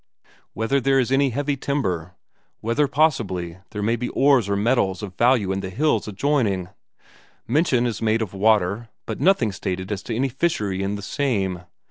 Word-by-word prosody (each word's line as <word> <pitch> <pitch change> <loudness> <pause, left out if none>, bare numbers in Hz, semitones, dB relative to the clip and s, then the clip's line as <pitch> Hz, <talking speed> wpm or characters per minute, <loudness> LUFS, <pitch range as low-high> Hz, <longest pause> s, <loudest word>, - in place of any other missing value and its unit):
Whether 115 +6 0
there 135 +1 +3
is 130 -1 +1
any 135 0 +3
heavy 145 +3 -1
timber. 95 - -2 0.4
Whether 115 +6 +1
possibly 100 - 0
there 105 -1 -4
may 115 +3 +2
be 120 +1 -3
ores 135 -7 +3
or 100 - +1
metals 105 -2 +1
of 100 -3 -6
value 120 -4 +3
an 95 - -1
the 95 - -5
hills 150 +8 0
adjoining. 105 -5 0 0.8
Mention 130 -1 +2
is 115 -4 -2
made 110 0 +2
of 100 - -7
water, 105 +2 +2 0.2
but 110 - -5
nothing 170 - +3
stated 95 0 -4
as 100 -2 -2
to 115 - -4
any 135 +3 0
fishery 110 - -1
in 100 +1 -1
the 100 - -7
same. 100 -10 -1
110 Hz, 175 wpm, -23 LUFS, 95-135 Hz, 0.8 s, there